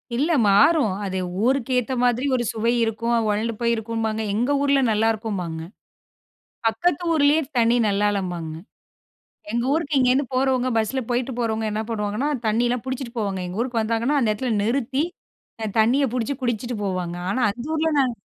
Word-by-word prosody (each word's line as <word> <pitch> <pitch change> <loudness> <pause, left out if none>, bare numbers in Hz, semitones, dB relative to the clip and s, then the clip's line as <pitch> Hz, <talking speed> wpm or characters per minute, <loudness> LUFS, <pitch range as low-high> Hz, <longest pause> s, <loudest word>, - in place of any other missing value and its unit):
இல்ல 295 +8 +1 0.2
மாறும். 215 - +4
அது 190 -1 -3 0.3
ஊருக்கு 265 -1 +1
ஏத்த 250 +2 -3
மாதிரி 245 +2 +2
ஒரு 240 - 0
சுவை 230 0 0
இருக்கும். 230 +1 -1 0.2
"ஒழண்டு 215 +3 0
போயிருக்கும்பாங்க, 225 -1 -1
எங்க 245 +5 +1
ஊர்ல 280 -1 +3
நல்லா 220 +1 +2
இருக்கும்பாங்க. 185 -7 -4 1.1
பக்கத்து 290 +9 0
ஊரிலேயே 300 0 +4 0.2
தண்ணி 230 0 +4
நல்லாளம்பாங்க." 195 -5 -1 1.0
எங்க 235 +1 0
ஊருக்கு 310 -3 -1
இங்கேருந்து 260 +2 +3
போறவங்க 255 -1 +1
பஸ்ஸில 225 +4 0
போய்ட்டு 250 +1 -1
போறவங்க 225 -2 -1
என்ன 215 +1 -1
பண்ணுவாங்கன்னா, 210 +5 -1 0.2
தண்ணியலாம் 240 +2 +1
புடிச்சிட்டு 260 -2 -5
போவாங்க. 200 -3 -2
எங்க 180 +4 -6
ஊருக்கு 245 -2 -1
வந்தாங்கன்னா, 230 +6 +1
அந்த 225 - +2
இடத்துல 245 +3 -2
நிறுத்தி 260 +4 0 0.6
அ - - -1
தண்ணிய 250 +6 +3
புடிச்சி 255 +3 -1
குடிச்சிட்டு 240 -1 -2
போவாங்க. 180 -2 -2
ஆனா 255 - -1
அந்த 235 +4 -7
ஊர்ல 320 0 +1
நாங்க 255 -3 +2
235 Hz, 150 wpm, -23 LUFS, 215-260 Hz, 1.1 s, மாறும்